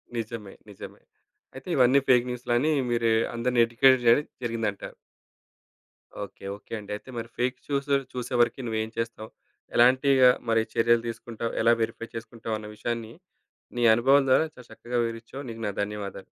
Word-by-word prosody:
నిజమే. 110 -3 -5 0.2
నిజమే. 100 - -11 0.5
అయితే 135 - -11
ఇవన్నీ 130 +1 +5
ఫేక్ 125 -1 +4
న్యూస్‌లని 125 +4 0 0.2
మీరు 115 -1 +2 0.2
అందరిని 120 0 +1
ఎడ్యుకేట్ 130 +3 +4
జరి 130 +6 +6 0.2
జరిగిందంటారు. 115 -4 -3 1.3
ఓకే. 100 - -12
ఓకే. 105 - -19
అండి. 105 0 -10
అయితే 120 - -11
మరి 115 0 -5
ఫేక్ 125 +1 0
చూసు 140 0 0 0.2
చూసే 125 0 -5
వరకి 120 +2 +1
నువ్వేం 110 0 -2
చేస్తావు? 115 -1 -4 0.5
ఎలాంటిగా 130 +1 +5 0.2
మరి 115 0 +3
చర్యలు 115 0 +3
తీసుకుంటావు? 115 0 -5
ఎలా 115 +1 +5
వెరిఫై 115 0 -3
చేసుకుంటావు 115 -1 -5
అన్న 105 - -9
విషయాన్ని 115 0 -4 0.6
నీ 120 - +1
అనుభవం 135 +4 +4
ద్వారా 145 +5 +4
చాలా 125 -2 -15
చక్కగా 120 0 -3
వివరించావు. 115 +4 -7
నీకు 115 0 -8
నా 100 - -3
ధన్యవాదాలు. 100 -2 -6
115 Hz, 145 wpm, -26 LUFS, 115-125 Hz, 1.3 s, జరి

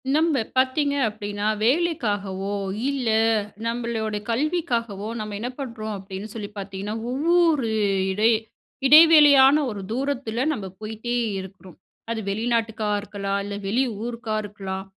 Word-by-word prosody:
நம்ப 315 -5 +2 0.2
பாத்தீங்க 280 +2 +2
அப்டினா, 205 -1 -4 0.2
வேலைக்காகவோ 210 - 0 0.4
இல்ல 265 -5 -1 0.6
நம்பளோட 230 -2 -2
கல்விக்காகவோ, 235 - -1
நம்ம 210 -1 -5
என்ன 240 +3 -3
பண்றோம்? 230 -5 -5
அப்டின்னு 195 +2 -8
சொல்லி 210 -3 -6
பாத்தீங்கன்னா, 195 +1 -5 0.2
ஒவ்வொரு 310 -1 +2 0.4
இடை 210 +4 +3 0.6
இடைவெளியான 295 -3 +8
ஒரு 205 -3 -5
தூரத்தில 255 -2 -2
நம்ம 215 -10 -4 0.2
போயிட்டே 220 +3 -4 0.2
இருக்குறோம். 190 -1 -11 0.3
அது 230 - -2
வெளிநாட்டுக்கா 220 0 -1
இருக்கலாம், 200 -1 -3
இல்ல 205 0 -5
வெளி 235 +7 +2 0.2
ஊருக்கா 235 -2 -4
இருக்கலாம், 195 -2 -6
225 Hz, 110 wpm, -24 LUFS, 205-265 Hz, 0.6 s, இடைவெளியான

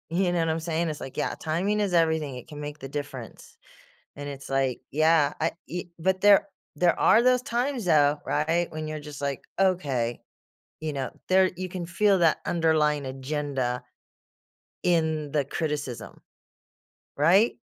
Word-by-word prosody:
You 180 +1 +1
know 175 - +1
what 165 - +1
I'm 160 +1 -1
saying? 165 0 -1
It's 150 - -6
like, 135 - -8
"Yeah, - - -1
timing 185 +7 0
is 200 -3 0
everything, 160 -5 +2
it 125 - -9
can 150 -2 -8
make 150 +1 -6
the 135 - -7
difference," 140 -4 -7 0.6
and 145 0 -6
it's 140 -1 -8
like, 135 -2 0
"Yeah, 155 0 +3
I 165 - +2 0.2
e" 175 +1 -4
but 190 +2 +1
there 200 -1 +6 0.3
there 175 +3 +3
are 230 - +5
those 250 0 +4
times, 250 -2 -2
though, 145 -3 +4
right, 165 +4 +1
when 155 0 -5
you're 155 0 -4
just 150 -1 -9
like, 140 -2 -2 0.2
"Okay," 140 -11 +1 0.6
you 155 -1 -3
know, 135 -2 -3 0.2
there 185 0 +5
you 185 0 -3
can 180 -1 -5
feel 195 +2 +3
that 165 -2 +3
underlying 155 -4 +2
agenda 135 -2 -3 1.0
...in 160 -4 +1
the 145 -2 +1
criticism. 145 -5 -4 1.0
Right? 190 +10 +4
155 Hz, 165 wpm, -26 LUFS, 145-180 Hz, 1.0 s, there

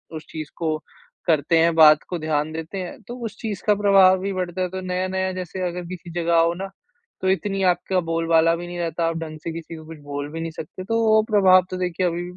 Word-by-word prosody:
उस 155 - -7
चीज़ 155 -2 -6
को 160 -2 -1 0.5
करते 160 0 +3
हैं 165 +1 +4
बात 155 -2 +7
को 180 - -2
ध्यान 155 -1 -1
देते 160 +4 -6
हैं। 185 +5 -6
तो 240 - -6
उस 220 -2 -6
चीज़ 215 -4 -5
का 210 - +6
प्रभाव 195 -2 +5
भी 195 +1 -3
बढ़ता 185 0 -3
है। 180 - 0
तो 185 +1 -5
नया-नया 185 +1 -1
जैसे 185 0 -5
अगर 175 0 -5
किसी 175 -1 -8
जगह 170 0 -1
आओ 165 0 +4
न 195 - -4 0.5
तो 190 - +1
इतनी 195 0 0
आपका 185 +1 -1
बोलबाला 165 0 +2
भी 175 +1 -7
नहीं 175 0 -7
रहता, 170 0 -1
आप 165 0 -2
ढंग 155 -1 -6
से 165 - -3
किसी 165 0 -7
को 160 -1 -11
कुछ 160 0 -10
बोल 145 0 -5
भी 165 - -5
नहीं 165 0 -4
सकते। 160 +3 -8
तो 225 +4 0
वो 220 0 +5
प्रभाव 185 -3 +6
तो 185 - -3
देखिए 180 0 -1
अभी 175 0 -2
175 Hz, 240 wpm, -23 LUFS, 165-185 Hz, 0.5 s, बात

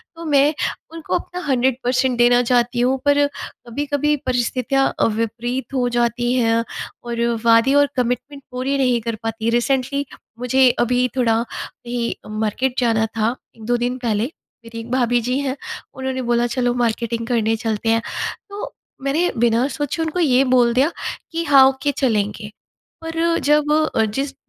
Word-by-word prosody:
तो 335 - -9
मैं 290 0 +4 0.4
उनको 330 -2 -3
अपना 360 0 -4
100% 255 -1 +1
देना 245 0 +5
चाहती 245 0 +1
हूँ। 255 +2 +2
पर 285 0 +4
कभी-कभी 285 +2 -3
परिस्थितियाँ 255 +2 +1
अ, - - +4
विपरीत 230 +4 -3
हो 250 -2 +1
जाती 240 0 0
हैं 230 -2 +2 0.4
और 235 -1 -3 0.2
वादे 230 +3 +5
और 285 0 +5
कमिटमेंट 255 +3 -2
पूरी 260 +2 -1
नहीं 250 -3 +2
कर 230 0 -3
पाती। 225 0 -2
रिसेंटली 265 +3 0 0.3
मुझे 255 +1 +4
अभी 250 +1 +2
थोड़ा 230 -3 +3
अभी 240 0 -5
मार्केट 220 +4 -1
जाना 225 -3 +2
था, 225 +2 -1 0.2
1-2 230 +2 -1
दिन 245 +1 -1
पहले, 225 -4 -1 0.4
मेरी 230 0 -8
एक 230 +1 -8
भाभी 245 -1 +2
जी 250 +3 -1
हैं 275 -1 -2 0.4
उन्होंने 265 0 -3
बोला 240 -1 +1
चलो 245 0 0
मार्केटिंग 235 -1 -1
करने 225 -2 +1
चलते 225 0 -2
हैं, 225 0 +3 0.5
तो 405 +1 -6 0.3
मैंने 300 +6 +1
बिना 235 +2 +3
सोचे 290 +3 -3
उनको 320 +2 -2
ये 270 -5 +4
बोल 240 -1 +4
दिया 270 +6 +3 0.4
कि 335 0 -2
हाँ, 275 -3 +7
ओके 270 +2 -1
चलेंगे। 210 -4 -1 0.5
पर 335 +1 0
जब 295 0 +3 0.2
अ, 225 - +3
जिस 270 +7 -3
245 Hz, 155 wpm, -20 LUFS, 235-275 Hz, 0.5 s, हाँ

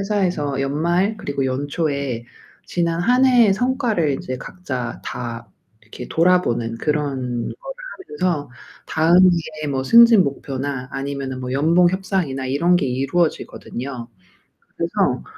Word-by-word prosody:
회사에서 180 -9 -1
연말 170 +9 0
그리고 140 -7 -3
연초에 140 -2 -2 0.4
지난 170 -1 -1
1 250 +8 +3
해의 240 -6 +5
성과를 235 - 0
이제 130 -1 -4
각자 130 -10 -5
다 115 -1 -6 0.3
이렇게 110 +3 -10
돌아보는 160 -10 +2
그런 135 -5 -2
거를 - - -8 0.4
하면서 160 -7 0 0.4
다음의 175 +4 +5 0.4
뭐 130 -1 -1
승진 230 - +7
목표나 135 -1 -4
아니면은 135 -1 -4
뭐 125 0 -4
연봉 165 +6 +4
협상이나 185 -8 -2
이런 170 +7 +2
게 160 - 0
이루어지거든요. 130 -3 -2 0.7
그래서 65 - 0
145 Hz, 275 characters per minute, -21 LUFS, 130-180 Hz, 0.7 s, 승진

